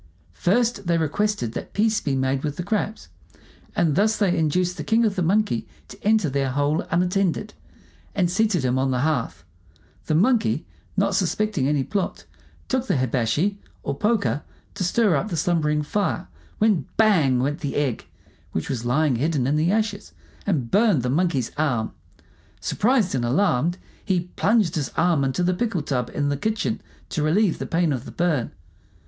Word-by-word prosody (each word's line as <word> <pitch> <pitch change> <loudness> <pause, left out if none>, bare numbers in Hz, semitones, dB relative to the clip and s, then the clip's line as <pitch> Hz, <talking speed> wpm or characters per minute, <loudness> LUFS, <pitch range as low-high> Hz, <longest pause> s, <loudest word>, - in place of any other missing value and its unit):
First, 210 - +1
they 170 -1 +3
requested 165 - 0
that - - -6
peace 215 0 +2
be 140 -2 -1
made 130 +1 0
with 145 -2 -2
the 175 - -4
crabs; 210 +2 -2 0.7
and 165 -4 +2
thus 215 +7 +2
they 195 -4 +2
induced 180 +3 +1
the - - -4
king 225 +1 +3
of 210 -3 0
the 185 - -1
monkeys 190 - +1 0.2
to - - -13
enter 215 -4 +3
their 135 -1 0
hole 145 +4 +1
unattended, 180 +3 0 0.6
and 190 -3 +2
seated 185 -4 +1
him 125 +1 +1
on 135 0 +1
the 125 -1 0
hearth. 140 - -1 0.6
The 155 - +1
Monkey, 180 - +2 0.3
not 200 +1 +2
suspecting 190 -4 0
any 145 -2 +1
plot, 200 +5 -3 0.4
took 260 -1 -1
the - - +1
hibashi, 130 - 0 0.2
or 140 - -2
poker, 210 -5 +1 0.3
to 200 - -3
stir 195 0 +3
up 190 +10 -1
the 170 - -3
slumbering 150 -2 +1
fire, 190 +3 -1 0.3
when 210 - +2
bang! 165 - +4
went 145 +5 -1
the 145 -5 -4
egg, 140 -6 -1 0.5
which 80 - -2
was 120 -3 -3
lying 135 +2 +2
hidden 145 -1 0
in 140 +3 +1
the 160 +4 +2
ashes, 210 -1 -1 0.3
and 140 -12 0
burned 205 - +3
the 125 - 0
Monkey's 150 -6 +1
arm. 125 -8 0 0.7
Surprised 230 -4 +1
and 130 -3 0
alarmed, 155 +4 +1 0.3
he 180 -3 -1
plunged 210 -5 +2
his 145 -5 -2
arm 165 -4 +3
into 135 +6 0
the 180 +1 +2
pickle 190 -5 -1
tub 125 -4 -1
in 145 -1 -1
the 145 - -1
kitchen 220 +5 -1 0.3
to 160 - -2
relieve 170 +5 +2
the - - -4
pain 165 -2 +1
of 130 0 -4
the - - -8
burn. 160 -8 0
170 Hz, 175 wpm, -23 LUFS, 140-205 Hz, 0.7 s, bang